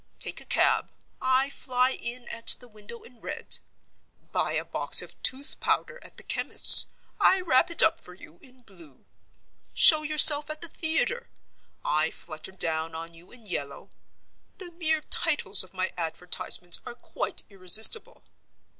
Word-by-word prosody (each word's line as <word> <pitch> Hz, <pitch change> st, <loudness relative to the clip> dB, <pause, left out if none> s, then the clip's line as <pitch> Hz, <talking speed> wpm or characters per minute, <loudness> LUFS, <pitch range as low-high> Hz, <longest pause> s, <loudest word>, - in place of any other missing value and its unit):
Take -, -, -3 dB
a -, -, -15 dB
cab—I 260 Hz, +1 st, -2 dB
fly 255 Hz, -1 st, -2 dB
in 240 Hz, -1 st, -9 dB
at 230 Hz, 0 st, +1 dB
the 245 Hz, -, -15 dB
window 215 Hz, +1 st, -14 dB
in 240 Hz, -1 st, -20 dB
red. -, -, -3 dB, 0.7 s
Buy -, -, -2 dB
a -, -, -4 dB
box -, -, +4 dB
of -, -, -10 dB
tooth 270 Hz, +3 st, -2 dB
powder 485 Hz, +1 st, -3 dB
at -, -, -15 dB
the -, -, -6 dB
chemist's—I 380 Hz, -, +4 dB
wrap 335 Hz, -1 st, 0 dB
it 335 Hz, -, +2 dB
up -, -, 0 dB
for 180 Hz, -, -13 dB
you 175 Hz, -2 st, -18 dB
in 255 Hz, -1 st, -21 dB
blue. 170 Hz, -, -20 dB, 0.7 s
Show 310 Hz, -3 st, +5 dB
yourself 300 Hz, -1 st, +5 dB
at 310 Hz, 0 st, -8 dB
the 340 Hz, -, -7 dB
theater—I 480 Hz, +8 st, -5 dB
flutter -, -, -10 dB
down 160 Hz, -3 st, -4 dB
on 165 Hz, +1 st, -10 dB
you 165 Hz, +2 st, -20 dB
in 240 Hz, -2 st, -16 dB
yellow. 145 Hz, -7 st, -8 dB, 0.7 s
The 360 Hz, -2 st, -11 dB
mere 320 Hz, -2 st, -3 dB
titles 290 Hz, -, +3 dB
of 185 Hz, -, -16 dB
my 185 Hz, 0 st, -5 dB
advertisements 175 Hz, +1 st, -2 dB
are 240 Hz, -, -11 dB
quite 240 Hz, -, -5 dB
irresistible. 200 Hz, -, +2 dB
245 Hz, 145 wpm, -24 LUFS, 185-310 Hz, 0.7 s, Show